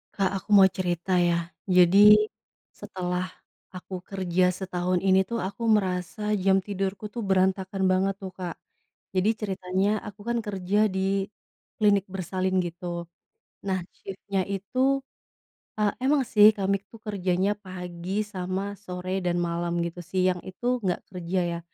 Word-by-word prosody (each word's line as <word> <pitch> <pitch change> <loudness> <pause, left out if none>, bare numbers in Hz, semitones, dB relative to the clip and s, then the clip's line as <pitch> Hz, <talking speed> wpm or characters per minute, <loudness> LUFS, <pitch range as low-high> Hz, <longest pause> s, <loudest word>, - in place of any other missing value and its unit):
Kak 195 -2 +1
Aku 200 - -30
mau 195 - +9
cerita 180 0 0
ya. 170 -1 +1 0.2
Jadi, 195 +4 +8 0.6
setelah 185 -2 -4 0.4
aku 185 0 -7
kerja 185 -1 +1
setahun 180 -1 -1
ini 190 0 +5
tuh 235 - -1
aku 225 +4 -3
merasa 210 0 0
jam 190 0 +5
tidurku 195 +1 -3
tuh 235 - -4
berantakan 190 0 +1
banget 190 +1 +1
tuh 190 -2 -7
Kak. 180 -3 -6 0.6
Jadi 185 +3 +3
ceritanya 190 -1 -1 0.2
aku 205 0 -10
kan 235 - +1
kerja 200 +1 +1
di 190 +1 0 0.5
klinik 200 -2 +3
bersalin 185 0 -1
gitu. 175 0 -5 0.6
Nah 190 -1 +1 0.2
shift-nya 195 0 -3
itu 260 +8 +1 0.8
eee, 210 -1 +3
emang 280 +1 +3
sih 210 -1 +9
kami 200 0 +1
itu 225 - -15
kerjanya 190 -1 0
pagi 180 -1 -7 0.2
sama 185 +1 -2 0.2
sore 185 +1 -3
dan 175 0 +1
malam 170 0 -1
gitu. 170 +1 -6
Siang 185 -1 +2
itu 190 +6 -10 0.2
nggak 180 -2 0
kerja 180 0 -2
ya. 170 - -3
190 Hz, 140 wpm, -26 LUFS, 180-200 Hz, 0.8 s, mau